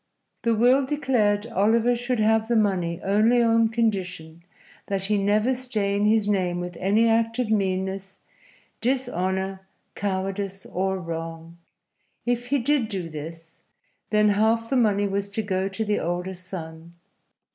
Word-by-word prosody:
The 230 -1 +2
will 250 +5 +4
declared 245 -7 +1
Oliver 230 +2 +2
should 245 0 -2
have 220 +1 +3
the 235 - +1
money 185 -6 +1
only 215 +5 +3
on 230 -1 +3
condition 185 -8 -2 0.5
that 195 -1 -2
he 210 +1 +1
never 210 +5 +2
stain 210 -5 -1
his 215 -1 +3
name 180 -4 0
with 175 0 -5
any 210 +5 +3
act 225 0 +2
of 245 -4 -1
meanness, 190 -1 -1 0.6
dishonor, 190 -6 -1 0.3
cowardice 195 0 -3
or 190 +1 -1
wrong. 165 -1 -7 0.7
If 245 0 -1
he 280 - +2
did 270 -1 +1
do 190 -6 -4
this, 165 +2 -9 0.5
then 210 0 +4
half 225 +3 +1
the - - +2
money 205 -4 +3
was 200 +1 -2
to 215 +2 -2
go 190 -1 -1
to 220 +3 -3
the 210 0 0
older 180 +2 -2
son. 170 -2 -9
205 Hz, 145 wpm, -25 LUFS, 185-230 Hz, 0.7 s, will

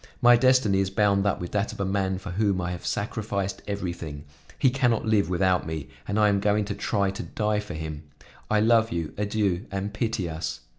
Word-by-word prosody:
My 120 -1 +7
destiny 120 -5 +4
is 95 -1 +1
bound 100 0 +2
up 100 - 0
with 90 - -5
that 105 +1 0
of - - -11
a 100 - 0
man 95 -1 0
for 95 0 -7
whom 100 0 +1
I 90 0 -2
have 90 - -6
sacrificed 100 -2 -2
everything; 85 -7 -4 0.3
he 130 - +3
can 130 -1 +2
not 115 -1 0
live 110 -3 +2
without 90 -1 +1
me 80 -3 -5 0.2
and 100 +1 0
I 105 - +5
am 100 -1 +2
going 105 +1 +2
to 100 - -3
try 100 -1 0
to 100 - -6
die 105 -1 -1
for 105 -4 -6
him. 80 -1 -6 0.4
I 105 -1 +3
love 115 0 +4
you; 85 -3 -3
adieu, 100 -2 -1
and 100 +1 -3
pity 110 -4 -1
us." 80 -6 -4
100 Hz, 215 wpm, -26 LUFS, 90-105 Hz, 0.4 s, My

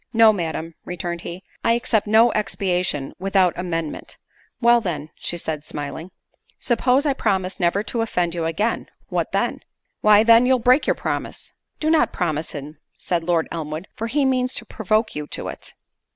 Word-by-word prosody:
"No, 225 -1 +7
Madam," 165 -3 -4
returned 175 -1 -4
he, 175 +3 -7 0.2
"I 230 - +4
accept 225 -3 +1
no 225 +3 +5
expiation 180 -8 -1
without 190 -2 +2
amendment." 165 -3 -4 0.4
"Well, 235 0 +5
then," 160 -6 -4
said 160 -3 -3
she, - - -13
smiling, 150 +4 -5 0.5
"suppose 250 +4 +2
I 285 - +3
promise 195 -6 -1
never 180 +3 +1
to 230 +1 -2
offend 180 -6 0
you 170 -2 -2
again, 205 +8 -1 0.2
what - - -1
then?" - - 0 0.4
"Why, 210 0 +6
then, 230 +2 +6
you'll 260 0 +4
break 250 +4 +3
your - - +3
promise." - - -4 0.3
"Do 310 0 +1
not 320 - +3
promise 160 -3 -2
him," 145 +1 -8 0.2
said 175 -2 -1
Lord 165 -1 +1
Elmwood, 160 +2 -5
"for 225 - -3
he 280 +4 +1
means 255 -1 +1
to - - -2
provoke 220 +1 0
you 150 0 -5
to - - -4
it." - - -9
190 Hz, 170 wpm, -22 LUFS, 165-230 Hz, 0.5 s, No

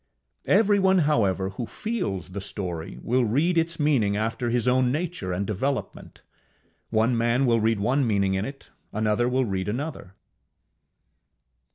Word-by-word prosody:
Everyone, 195 -2 +4
however, 100 -10 +1
who 115 +4 -5
feels 180 - -4
the 100 +1 -5
story, 95 -3 -5
will 125 +2 +2
read 145 +11 +1
its 165 0 0
meaning 125 -10 +2
after 115 +3 -1
his 120 +1 0
own 125 0 +3
nature 155 - -3
and 90 +3 -1
development: 130 +8 -4 0.7
one 115 +2 +2
man 120 +3 +2
will 115 -2 +3
read 110 -1 +1
one 125 +5 +1
meaning 100 -3 +1
in 95 +1 0
it, 135 +4 -9 0.2
another 110 +3 +1
will 130 +1 +1
read 95 -2 -2
another. 125 - -5
115 Hz, 145 wpm, -25 LUFS, 100-140 Hz, 0.7 s, Everyone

